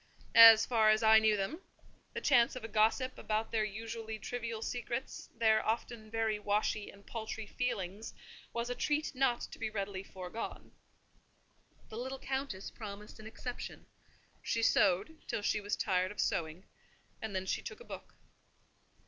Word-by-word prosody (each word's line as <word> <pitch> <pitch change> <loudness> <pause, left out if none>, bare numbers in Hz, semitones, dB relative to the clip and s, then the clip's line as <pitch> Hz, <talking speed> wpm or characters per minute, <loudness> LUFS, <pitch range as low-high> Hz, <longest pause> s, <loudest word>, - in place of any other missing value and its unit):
As 225 -1 +10
far 220 -3 +4
as 215 +1 +4
I 220 0 +8
knew 220 -1 +3
them, 200 - -3 0.5
the - - -4
chance 235 +1 +4
of 255 - -7
a - - -4
gossip 225 +4 +1
about 220 +1 -1
their 220 -1 +1
usually 220 +1 -5
trivial 230 +2 -4
secrets, 245 +1 -4
their 220 -1 +4
often 220 0 -3
very 220 -1 0
washy 210 0 0
and 200 0 -15
paltry 225 -1 -5
feelings, 210 -3 -3 0.4
was 235 0 -2
a - - +1
treat 295 +4 -1
not 255 -2 +1
to - - -8
be 225 - -2
readily 200 -2 -3
foregone. 190 +3 -7 1.2
The 220 - -6
little 260 +2 -4
Countess 265 -7 -4
promised 210 -1 -9
an 220 - -9
exception: 240 +2 -7 0.6
she 230 - -1
sewed 200 - +3
till 205 - -2
she 210 - +1
was 205 +1 -1
tired 185 -2 +1
of 210 - -11
sewing, 165 +3 -1 0.6
and 220 -3 -4
then 190 0 -1
she - - -1
took - - -8
a - - -11
book. - - -10
220 Hz, 160 wpm, -33 LUFS, 205-235 Hz, 1.2 s, As